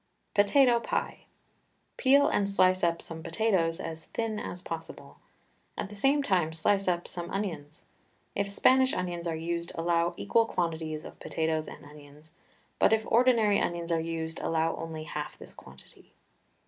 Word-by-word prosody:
POTATO 235 Hz, +4 st, +5 dB
PIE. -, -, -3 dB, 0.7 s
Peel 280 Hz, +2 st, +5 dB
and 200 Hz, -1 st, +1 dB
slice 185 Hz, -1 st, +3 dB
up 170 Hz, -1 st, +1 dB
some 165 Hz, -1 st, -8 dB
potatoes 175 Hz, -4 st, +1 dB
as 160 Hz, -1 st, -6 dB
thin 225 Hz, -2 st, -3 dB
as 180 Hz, -, -6 dB
possible. 165 Hz, 0 st, -8 dB, 0.6 s
At 195 Hz, -, -3 dB
the 205 Hz, -, -10 dB
same 275 Hz, +7 st, +2 dB
time 180 Hz, -, +1 dB
slice 195 Hz, +5 st, +1 dB
up 175 Hz, -1 st, 0 dB
some 175 Hz, -1 st, -5 dB
onions. 160 Hz, -7 st, -5 dB, 0.5 s
If 200 Hz, 0 st, -1 dB
Spanish 260 Hz, +6 st, +4 dB
onions 175 Hz, -1 st, -3 dB
are 165 Hz, -, -1 dB
used 170 Hz, +1 st, -3 dB
allow 170 Hz, 0 st, +1 dB
equal 225 Hz, +3 st, +2 dB
quantities 160 Hz, -4 st, -2 dB
of -, -, -11 dB
potatoes 160 Hz, -1 st, -1 dB
and -, -, -10 dB
onions, 150 Hz, +1 st, -15 dB, 0.5 s
but -, -, +5 dB
if 220 Hz, 0 st, +2 dB
ordinary 230 Hz, -4 st, +4 dB
onions 170 Hz, 0 st, -2 dB
are 165 Hz, -, +2 dB
used 160 Hz, 0 st, -4 dB
allow 165 Hz, 0 st, 0 dB
only 160 Hz, -1 st, -6 dB
half 150 Hz, -1 st, -6 dB
this -, -, -11 dB
quantity. -, -, -15 dB
170 Hz, 155 wpm, -29 LUFS, 160-205 Hz, 0.7 s, POTATO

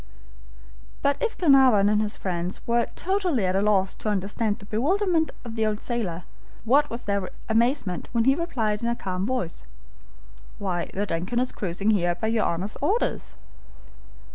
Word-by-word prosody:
But 280 Hz, 0 st, +1 dB
if 465 Hz, -2 st, -1 dB
Glenarvan 265 Hz, -, +5 dB
and 210 Hz, 0 st, +3 dB
his 210 Hz, 0 st, -2 dB
friends 180 Hz, 0 st, -3 dB
were 235 Hz, 0 st, +2 dB
totally 360 Hz, -, 0 dB
at 185 Hz, 0 st, 0 dB
a 195 Hz, -, +3 dB
loss 195 Hz, -2 st, +2 dB
to 215 Hz, -, -3 dB
understand 205 Hz, +2 st, -1 dB
the 200 Hz, -, -12 dB
bewilderment 320 Hz, -, +1 dB
of 230 Hz, -1 st, -6 dB
the 220 Hz, -, 0 dB
old 210 Hz, -1 st, -1 dB
sailor, 190 Hz, -8 st, -2 dB, 0.4 s
what 285 Hz, +5 st, +4 dB
was 235 Hz, +1 st, -6 dB
their 200 Hz, -2 st, -1 dB, 0.2 s
amazement 225 Hz, -, +1 dB
when 230 Hz, -1 st, +2 dB
he 270 Hz, -, +6 dB
replied 235 Hz, -10 st, -1 dB
in 235 Hz, -, -1 dB
a 235 Hz, -, 0 dB
calm 185 Hz, -2 st, -3 dB
voice: 250 Hz, -10 st, -3 dB, 1.0 s
"The 190 Hz, +1 st, -2 dB
DUNCAN 180 Hz, +9 st, -2 dB
is 255 Hz, 0 st, 0 dB
cruising 195 Hz, +3 st, -1 dB
here 175 Hz, -4 st, +2 dB
by 220 Hz, +5 st, -2 dB
your 225 Hz, -1 st, +1 dB
Honor's 180 Hz, +5 st, -2 dB
orders." 400 Hz, +12 st, 0 dB
215 Hz, 165 wpm, -25 LUFS, 195-255 Hz, 1.0 s, he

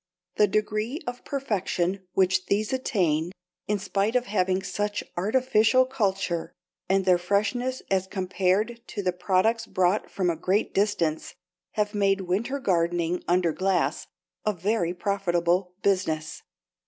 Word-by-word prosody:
The 210 Hz, -, +5 dB
degree 215 Hz, -, -1 dB
of 245 Hz, 0 st, -6 dB
perfection 195 Hz, -8 st, -1 dB
which 185 Hz, -1 st, +2 dB
these 210 Hz, +4 st, 0 dB
attain 175 Hz, -10 st, 0 dB, 0.4 s
in 210 Hz, -, +1 dB
spite 200 Hz, +3 st, -1 dB
of 250 Hz, 0 st, +2 dB
having 190 Hz, -3 st, 0 dB
such 205 Hz, 0 st, -2 dB
artificial 235 Hz, +4 st, +3 dB
culture, 195 Hz, -9 st, -1 dB, 0.4 s
and 190 Hz, 0 st, +2 dB
their 180 Hz, -2 st, +4 dB
freshness 215 Hz, +8 st, 0 dB
as 190 Hz, -1 st, +1 dB
compared 190 Hz, +4 st, 0 dB
to 205 Hz, -, -5 dB
the 180 Hz, -1 st, +1 dB
products 195 Hz, +6 st, +1 dB
brought 185 Hz, +3 st, +1 dB
from 180 Hz, -3 st, 0 dB
a -, -, -3 dB
great 190 Hz, +6 st, 0 dB
distance, 185 Hz, -6 st, 0 dB, 0.4 s
have 210 Hz, 0 st, 0 dB
made 200 Hz, -1 st, +2 dB
winter 205 Hz, +9 st, -1 dB
gardening 175 Hz, -4 st, 0 dB
under 175 Hz, -1 st, +3 dB
glass 190 Hz, +2 st, 0 dB, 0.4 s
a 215 Hz, -, +1 dB
very 185 Hz, -1 st, -1 dB
profitable 180 Hz, -2 st, 0 dB
business. 160 Hz, -6 st, 0 dB
195 Hz, 130 wpm, -26 LUFS, 180-215 Hz, 0.4 s, The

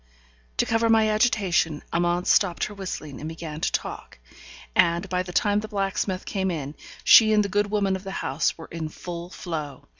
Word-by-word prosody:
To -, -, +2 dB
cover 225 Hz, 0 st, +1 dB
my 220 Hz, -1 st, +4 dB
agitation, 200 Hz, -8 st, +1 dB
Amante 175 Hz, +1 st, +1 dB
stopped 180 Hz, -5 st, +3 dB
her 210 Hz, -, -3 dB
whistling, 180 Hz, -8 st, -6 dB
and 155 Hz, -, -5 dB
began 160 Hz, -1 st, -7 dB
to -, -, +1 dB
talk; -, -, -4 dB, 0.6 s
and, 170 Hz, +3 st, +3 dB
by 180 Hz, 0 st, 0 dB
the 180 Hz, -1 st, -6 dB
time 205 Hz, +3 st, +2 dB
the 215 Hz, -, -5 dB
blacksmith 195 Hz, -2 st, -2 dB
came 190 Hz, -2 st, -1 dB
in, 150 Hz, -5 st, -4 dB, 0.3 s
she 220 Hz, -1 st, +8 dB
and 210 Hz, -1 st, +4 dB
the -, -, -3 dB
good 205 Hz, +1 st, +1 dB
woman 200 Hz, -2 st, +1 dB
of 190 Hz, -, -7 dB
the 195 Hz, -, -6 dB, 0.2 s
house 140 Hz, +4 st, 0 dB
were 165 Hz, -, -9 dB
in 160 Hz, -2 st, -4 dB
full 170 Hz, +2 st, -7 dB
flow. 155 Hz, -8 st, -6 dB
185 Hz, 190 wpm, -25 LUFS, 165-205 Hz, 0.6 s, she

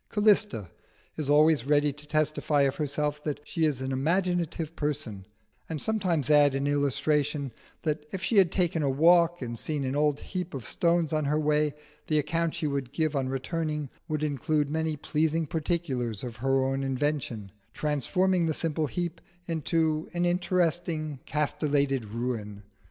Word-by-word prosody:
Callista 205 Hz, -, +2 dB, 0.4 s
is 150 Hz, -3 st, -4 dB
always 150 Hz, -2 st, +4 dB
ready 145 Hz, -1 st, +3 dB
to 145 Hz, +1 st, -13 dB
testify 155 Hz, -1 st, +1 dB
of 135 Hz, 0 st, 0 dB
herself 150 Hz, 0 st, -2 dB
that 150 Hz, -2 st, -2 dB
she 160 Hz, +2 st, 0 dB
is 145 Hz, -4 st, 0 dB
an 130 Hz, 0 st, -2 dB
imaginative 165 Hz, +2 st, 0 dB
person, 115 Hz, -11 st, -3 dB, 0.4 s
and 160 Hz, -2 st, -3 dB
sometimes 185 Hz, -, 0 dB
adds 145 Hz, -2 st, +6 dB
in 135 Hz, +1 st, -1 dB
illustration, 145 Hz, 0 st, 0 dB, 0.3 s
that 150 Hz, -1 st, -1 dB
if 190 Hz, -, -5 dB
she 225 Hz, -, +1 dB
had 185 Hz, -3 st, +6 dB
taken 175 Hz, -4 st, +1 dB
a 140 Hz, -, +1 dB
walk 170 Hz, +3 st, +4 dB
and 120 Hz, -2 st, -5 dB
seen 150 Hz, -3 st, -2 dB
an 130 Hz, +1 st, -2 dB
old 150 Hz, -1 st, +2 dB
heap 180 Hz, -4 st, -5 dB
of 125 Hz, -5 st, -6 dB
stones 170 Hz, -, +1 dB
on 155 Hz, -1 st, +1 dB
her 150 Hz, +2 st, +1 dB
way, 150 Hz, -1 st, +1 dB, 0.3 s
the 155 Hz, -, +2 dB
account 165 Hz, +2 st, 0 dB
she -, -, -3 dB
would 140 Hz, -3 st, -2 dB
give 155 Hz, 0 st, 0 dB
on 135 Hz, -2 st, 0 dB
returning 150 Hz, +1 st, -3 dB, 0.2 s
would 155 Hz, -1 st, -2 dB
include 145 Hz, 0 st, 0 dB
many 160 Hz, -1 st, -1 dB
pleasing 155 Hz, +3 st, 0 dB
particulars 145 Hz, -, -2 dB
of 120 Hz, -3 st, -6 dB
her 135 Hz, +2 st, +1 dB
own 135 Hz, +1 st, -1 dB
invention, 135 Hz, -6 st, -2 dB, 0.2 s
transforming 170 Hz, +5 st, +1 dB
the 160 Hz, -, 0 dB
simple 160 Hz, -2 st, -1 dB
heap 175 Hz, +3 st, -4 dB, 0.2 s
into 160 Hz, -1 st, 0 dB
an 175 Hz, 0 st, +1 dB
interesting 175 Hz, -4 st, 0 dB
castellated 145 Hz, -3 st, 0 dB
ruin. 105 Hz, -2 st, -4 dB
150 Hz, 160 wpm, -28 LUFS, 135-165 Hz, 0.4 s, adds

